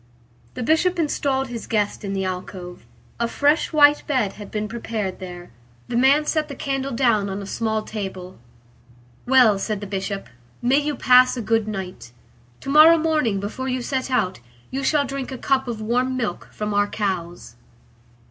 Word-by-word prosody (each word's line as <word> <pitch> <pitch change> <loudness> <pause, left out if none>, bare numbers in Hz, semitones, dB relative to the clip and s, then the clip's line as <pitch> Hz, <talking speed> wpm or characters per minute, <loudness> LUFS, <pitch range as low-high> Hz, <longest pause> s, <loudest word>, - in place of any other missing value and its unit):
The 250 - -3
Bishop 325 +7 +2
installed 275 -4 0
his 235 -2 -6
guest 210 -2 -1
in 200 -1 -3
the 190 -1 -1
alcove. 180 - -6 0.3
A 235 - +1
fresh 290 +6 +1
white 295 -2 +6
bed 255 -9 0
had 205 -1 -10
been 215 0 -3
prepared 220 -4 -4
there. 180 -1 -9 0.4
The 240 - -3
man 275 +5 +4
set 310 -1 0
the 280 - -7
candle 270 0 -2
down 230 -5 +2
on 195 +1 -4
a 200 - -6
small 220 +1 -2
table. 190 - -7 0.9
"Well," 245 -6 +5
said 210 0 -2
the 205 - -6
Bishop, 195 0 -4 0.3
"may 255 +4 +3
you 295 0 -2
pass 255 0 +5
a - - -2
good 225 0 +1
night. 185 - -6 0.5
To - - -7
morrow 315 +3 +8
morning, 305 -11 +1
before 220 +6 -5
you 255 -1 -2
set 265 0 -2
out, 215 -8 0 0.3
you 270 +1 -3
shall 285 +1 +2
drink 270 -1 -5
a 260 - -5
cup 265 +1 0
of 230 -3 -4
warm 250 +4 0
milk 215 -8 -3
from 210 -1 -4
our 205 0 +2
cows." 175 - -4
230 Hz, 175 wpm, -22 LUFS, 200-270 Hz, 0.9 s, morrow